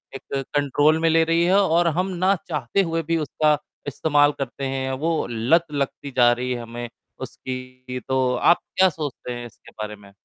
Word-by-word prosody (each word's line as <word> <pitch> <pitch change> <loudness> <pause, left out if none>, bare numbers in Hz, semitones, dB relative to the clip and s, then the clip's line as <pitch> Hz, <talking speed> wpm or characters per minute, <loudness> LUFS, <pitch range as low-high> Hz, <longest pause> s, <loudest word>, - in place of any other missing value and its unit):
एक 135 0 -4
कंट्रोल 145 +2 +3
में 165 0 +2
ले 165 0 +4
रही 165 +1 +2
है 190 +3 +4
और 170 -2 +3
हम 185 +1 +1 0.2
ना 195 +1 +4
चाहते 150 +3 0
हुए 165 -2 -1
भी 165 +1 0
उसका 150 -1 +1 0.3
इस्तेमाल 145 +1 +3
करते 135 +1 -5
हैं, 130 0 -2
वो 160 +5 -1
लत 125 +10 +2
लगती 140 0 -3
जा 120 -1 +6
रही 125 +1 -2
है 120 - -2
हमें 120 +1 -7 0.3
उसकी। 130 0 -7
तो 130 -1 +1
आप 170 +7 +4 0.2
क्या 190 0 +6
सोचते 145 -6 -6
हैं 120 0 -6
इसके 115 - -15
बारे 105 0 -5
में? 100 -1 -17
140 Hz, 185 wpm, -23 LUFS, 125-165 Hz, 0.3 s, जा